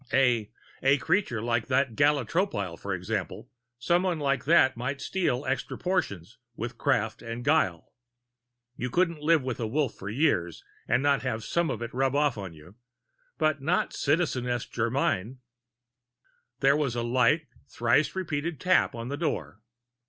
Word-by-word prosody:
A 120 Hz, -5 st, +3 dB, 0.3 s
a 135 Hz, +2 st, +4 dB
creature 130 Hz, -, 0 dB
like 115 Hz, -1 st, 0 dB
that 130 Hz, -3 st, +1 dB
Gala 145 Hz, -1 st, +3 dB
Tropile, 105 Hz, -, -1 dB
for 100 Hz, -, -6 dB
example 95 Hz, -, -4 dB, 0.3 s
someone 175 Hz, +7 st, +1 dB
like 140 Hz, -2 st, 0 dB
that 135 Hz, -4 st, +5 dB
might 130 Hz, +4 st, -3 dB
steal 150 Hz, -8 st, -1 dB
extra 130 Hz, +1 st, -2 dB
portions 140 Hz, -, -2 dB, 0.2 s
with -, -, -6 dB
craft -, -, 0 dB
and 115 Hz, +1 st, -6 dB
guile. 145 Hz, -, +1 dB, 0.8 s
You 125 Hz, -, -3 dB
couldn't 170 Hz, +2 st, +1 dB
live 160 Hz, -1 st, +3 dB
with 130 Hz, -2 st, -3 dB
a 115 Hz, -, -1 dB
Wolf 140 Hz, +2 st, 0 dB
for 100 Hz, -, -8 dB
years 105 Hz, -, 0 dB, 0.2 s
and 130 Hz, -, +2 dB
not 145 Hz, -1 st, +3 dB
have 115 Hz, -4 st, -3 dB
some 170 Hz, +6 st, 0 dB
of -, -, -3 dB
it 120 Hz, -, -6 dB
rub 135 Hz, +1 st, +1 dB
off 145 Hz, -3 st, +2 dB
on 100 Hz, -4 st, -6 dB
you. 80 Hz, +3 st, -15 dB, 0.6 s
But 155 Hz, -2 st, +1 dB
not 170 Hz, +6 st, +1 dB
Citizeness 130 Hz, -6 st, 0 dB
Germyn. 120 Hz, -1 st, -1 dB, 1.2 s
There 140 Hz, 0 st, +5 dB
was 140 Hz, -5 st, 0 dB
a 120 Hz, -, -1 dB
light, 130 Hz, +6 st, +2 dB, 0.2 s
thrice 120 Hz, +9 st, +1 dB
repeated 160 Hz, -3 st, -3 dB
tap 185 Hz, -7 st, +3 dB
on 115 Hz, +1 st, -5 dB
the 145 Hz, -, -3 dB
door. 145 Hz, -, -3 dB
130 Hz, 155 wpm, -27 LUFS, 115-150 Hz, 1.2 s, that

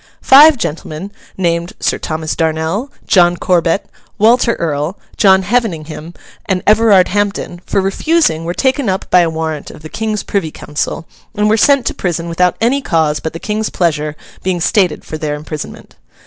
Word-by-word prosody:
Five 290 Hz, +2 st, +7 dB
gentlemen, 165 Hz, -1 st, -5 dB, 0.3 s
named 170 Hz, -2 st, -1 dB
Sir -, -, 0 dB
Thomas 155 Hz, 0 st, -3 dB
Darnel, 160 Hz, -, -1 dB, 0.2 s
John 175 Hz, -3 st, +4 dB
Corbet, 175 Hz, +1 st, +1 dB, 0.3 s
Walter 235 Hz, +2 st, +3 dB
Earl, 155 Hz, +2 st, -2 dB, 0.2 s
John 190 Hz, -3 st, +4 dB
Heveningham, 175 Hz, -7 st, -2 dB, 0.3 s
and 185 Hz, -2 st, -1 dB
Everard 210 Hz, -3 st, +5 dB
Hampden, 200 Hz, -3 st, -2 dB
for 200 Hz, -, +1 dB
refusing 195 Hz, -, +1 dB
were 170 Hz, +2 st, -4 dB
taken 265 Hz, -3 st, +1 dB
up 190 Hz, 0 st, -2 dB
by 180 Hz, -, +6 dB
a 170 Hz, -2 st, +3 dB
warrant 160 Hz, -2 st, -4 dB
of 150 Hz, -, -13 dB
the 155 Hz, -, -8 dB
King's 215 Hz, +1 st, -3 dB
privy 195 Hz, -6 st, -2 dB
council, 150 Hz, +2 st, -4 dB, 0.3 s
and 210 Hz, 0 st, +1 dB
were 215 Hz, -, +4 dB
sent 275 Hz, +2 st, +3 dB
to -, -, -1 dB
prison 170 Hz, -2 st, -3 dB
without 180 Hz, +1 st, +1 dB
any 255 Hz, +5 st, +1 dB
cause 160 Hz, -, 0 dB
but 160 Hz, -, -5 dB
the 165 Hz, -, -6 dB
King's 215 Hz, +2 st, -2 dB
pleasure 155 Hz, -3 st, -1 dB, 0.3 s
being 185 Hz, -1 st, -1 dB
stated 180 Hz, -3 st, +1 dB
for 155 Hz, -, -6 dB
their 150 Hz, -1 st, -2 dB
imprisonment. 150 Hz, 0 st, -8 dB
180 Hz, 165 wpm, -15 LUFS, 160-210 Hz, 0.3 s, Five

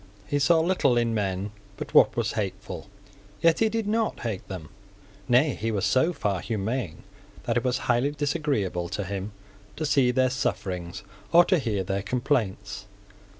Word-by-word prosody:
He 145 Hz, +7 st, 0 dB
saw 160 Hz, +4 st, +4 dB
little 160 Hz, -8 st, +2 dB
in 120 Hz, -1 st, +1 dB
men 100 Hz, -1 st, -1 dB, 0.3 s
but -, -, -7 dB
what -, -, +6 dB
was -, -, +1 dB
hateful. -, -, -5 dB, 0.5 s
Yet 165 Hz, -1 st, +4 dB
he 225 Hz, -, +3 dB
did 225 Hz, 0 st, -2 dB
not 220 Hz, +1 st, 0 dB
hate 110 Hz, -5 st, -4 dB
them. 90 Hz, -6 st, -7 dB, 0.6 s
Nay, 130 Hz, +4 st, +4 dB
he 110 Hz, +1 st, -3 dB
was 105 Hz, -3 st, 0 dB
so 130 Hz, -, +3 dB
far 105 Hz, -, -1 dB
humane 110 Hz, -5 st, -3 dB, 0.4 s
that 115 Hz, -1 st, -1 dB
it 120 Hz, -, +1 dB
was 125 Hz, 0 st, +1 dB
highly 125 Hz, +3 st, +2 dB
disagreeable 140 Hz, -, -1 dB
to 100 Hz, +2 st, -3 dB
him 100 Hz, +2 st, -4 dB, 0.4 s
to 155 Hz, -, -3 dB
see 135 Hz, -4 st, +3 dB
their 130 Hz, 0 st, +2 dB
sufferings 90 Hz, -9 st, -3 dB, 0.3 s
or 170 Hz, +1 st, +7 dB
to 185 Hz, -3 st, +3 dB
hear 105 Hz, -8 st, -1 dB
their 95 Hz, +2 st, -2 dB
complaints. 105 Hz, -5 st, -2 dB
120 Hz, 165 wpm, -26 LUFS, 100-145 Hz, 0.6 s, or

